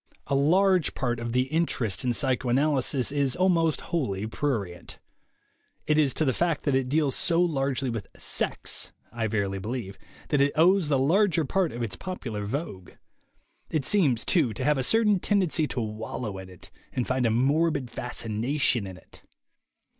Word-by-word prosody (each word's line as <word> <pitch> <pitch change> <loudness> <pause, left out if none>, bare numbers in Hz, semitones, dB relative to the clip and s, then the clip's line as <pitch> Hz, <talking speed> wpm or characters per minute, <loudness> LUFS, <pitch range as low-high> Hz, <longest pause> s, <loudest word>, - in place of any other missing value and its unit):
A - - -3
large 180 +5 +3
part 120 -3 -1
of 115 0 -4
the 125 +1 +2
interest 145 - -1
in 125 - +1
psychoanalysis 130 +1 +1
is 140 -3 0
almost 170 -4 +2
wholly 110 - -1
prurient. 110 - -3 0.9
It 150 0 +3
is 145 -3 +3
to 155 - +1
the 130 - +2
fact 170 -1 0
that 145 - +1
it 130 -1 +1
deals 145 -1 +2
so 170 -1 +1
largely 135 -6 0
with 115 -4 -5
"sex," - - -2 0.2
I 115 -2 -2
verily 100 -3 -1
believe, 105 -1 -5 0.3
that 145 -2 +2
it 140 +1 +3
owes 175 +1 +4
the 140 - +3
larger 165 +4 +3
part 185 +3 0
of 120 +1 -4
its 110 - -3
popular 115 - -5
vogue. 120 - -5 0.8
It 150 -4 -1
seems, 140 - +2
too, 145 -11 +2
to 130 - -4
have 150 0 +2
a - - 0
certain 210 - +3
tendency 180 -6 +1
to 130 - -4
wallow 110 -1 -5
in 95 0 -10
it 90 -2 -13 0.2
and 125 - -1
find 130 -2 +1
a - - +2
morbid 140 +2 +1
fascination 120 0 -1
in 95 -1 -9
it. - - -16
135 Hz, 170 wpm, -27 LUFS, 115-160 Hz, 0.9 s, owes